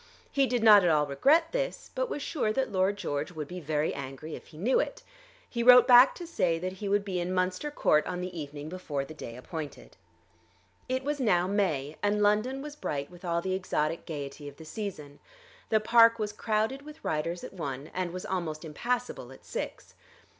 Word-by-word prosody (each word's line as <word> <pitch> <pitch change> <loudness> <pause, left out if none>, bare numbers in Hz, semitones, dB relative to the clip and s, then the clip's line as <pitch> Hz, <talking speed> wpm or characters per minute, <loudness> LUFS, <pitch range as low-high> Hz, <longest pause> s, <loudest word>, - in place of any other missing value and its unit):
He 275 -1 +3
did 245 -3 0
not 210 -3 +8
at 175 - +4
all 150 -2 +3
regret 285 - +3
this, - - -3
but - - -1
was 290 - -4
sure 255 -9 -1
that 265 +4 -1
Lord 190 +1 +1
George 150 -3 -3
would 155 -3 -5
be 180 +3 -6
very 155 -1 -1
angry 140 +3 -7
if - - -9
he 155 - -15
knew 225 +11 +2
it. - - -3 0.4
He 235 - -3
wrote 250 0 +8
back 250 +1 +8
to 350 - -7
say 185 - 0
that 185 +2 -3
he 205 - -2
would 200 0 +2
be 185 -3 -2
in 175 +1 -2
Munster 185 +9 0
Court 155 - +2
on 180 -1 -3
the 180 0 -5
evening 145 -1 -6
before 155 -5 -4
the 155 - -10
day 115 -6 -8
appointed. 150 +3 -8 0.9
It 260 +1 -1
was 290 +1 -2
now 180 -8 +3
May, 160 -8 -1
and 205 0 +1
London 225 +7 +1
was 295 0 -7
bright 140 - -4
with 175 0 -14
all 170 -1 -1
the 190 - -1
exotic 165 -4 -1
gaiety 145 -1 -6
of 140 - -10
the 160 - -11
season. 155 -7 -6 0.5
The 220 - +4
park 230 +1 +6
was 210 -2 -3
crowded 220 +5 -1
with 300 +2 -13
riders 165 +3 -2
at - - -8
one, 140 -5 -5
and 185 -1 -2
was 185 +1 -6
almost 165 -4 -3
impassable 235 - -3
at 135 - -15
six. - - -6
185 Hz, 205 wpm, -29 LUFS, 155-230 Hz, 0.9 s, not